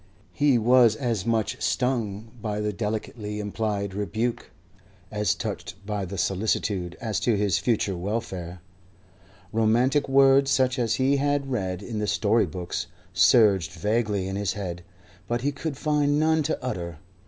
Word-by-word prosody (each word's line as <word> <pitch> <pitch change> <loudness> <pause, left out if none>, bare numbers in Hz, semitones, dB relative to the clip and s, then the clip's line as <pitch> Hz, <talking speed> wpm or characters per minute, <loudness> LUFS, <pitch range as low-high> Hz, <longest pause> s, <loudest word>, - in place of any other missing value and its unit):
He 145 -3 +3
was 120 -1 +5
as 115 -4 -2
much 115 -2 0
stung 115 -4 -1
by 105 -1 -2
the 105 0 -1
delicately 105 0 -4
implied 105 -1 -2
rebuke 110 +4 -2 0.6
as 105 0 +1
touched 85 - -5
by 105 -2 -2
the 95 +2 -6
solicitude 95 -2 -1
as 110 -3 -2
to 115 -4 +1
his 100 -3 +1
future 105 -5 0
welfare. 90 -3 -4 0.9
Romantic 120 +6 +2
words, 135 0 +5
such 130 -1 +2
as 115 -1 +1
he 135 +2 +2
had 145 -1 0
read 95 -5 -2
in 110 -1 -4
the 105 - -1
story 105 +1 +2
books, 90 +2 -4 0.3
surged 95 -2 +4
vaguely 105 +1 0
in 95 +1 -3
his 100 -1 -1
head, 90 -4 -5 0.5
but 120 0 -1
he 145 +3 0
could 145 0 -5
find 145 -1 +1
none 160 0 +3
to 145 - -1
utter. 85 -10 -4
110 Hz, 150 wpm, -25 LUFS, 100-125 Hz, 0.9 s, was